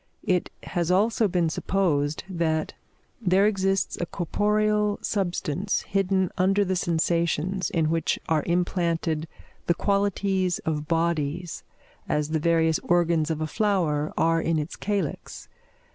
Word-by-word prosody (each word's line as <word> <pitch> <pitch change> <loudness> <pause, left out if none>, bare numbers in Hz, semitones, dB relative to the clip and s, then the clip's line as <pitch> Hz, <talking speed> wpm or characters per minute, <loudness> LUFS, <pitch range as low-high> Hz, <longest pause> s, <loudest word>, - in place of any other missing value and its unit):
It 180 -1 +1
has 170 -1 -2
also 215 +4 +3
been 175 -3 +1
supposed, 155 -4 0
that 165 -4 -1 0.5
there 190 -1 +3
exists 195 -2 0
a 175 - -2
corporeal 210 +4 +1
substance 190 -1 -1
hidden 190 -1 0
under 195 +2 +3
the 185 0 0
sensations, 170 +1 0
in 160 -2 +1
which 165 -2 0
are 160 -2 +2
implanted 170 -2 0 0.4
the 170 - +3
qualities 200 -2 +1
of 150 -1 -2
bodies, 165 0 -1 0.5
as 150 0 0
the 160 0 0
various 160 0 +2
organs 170 -2 +2
of 160 -1 -2
a - - 0
flower 160 -6 0
are 165 0 +3
in 165 0 0
its 150 +2 -3
calyx. 200 -7 -3
175 Hz, 130 wpm, -25 LUFS, 160-195 Hz, 0.5 s, also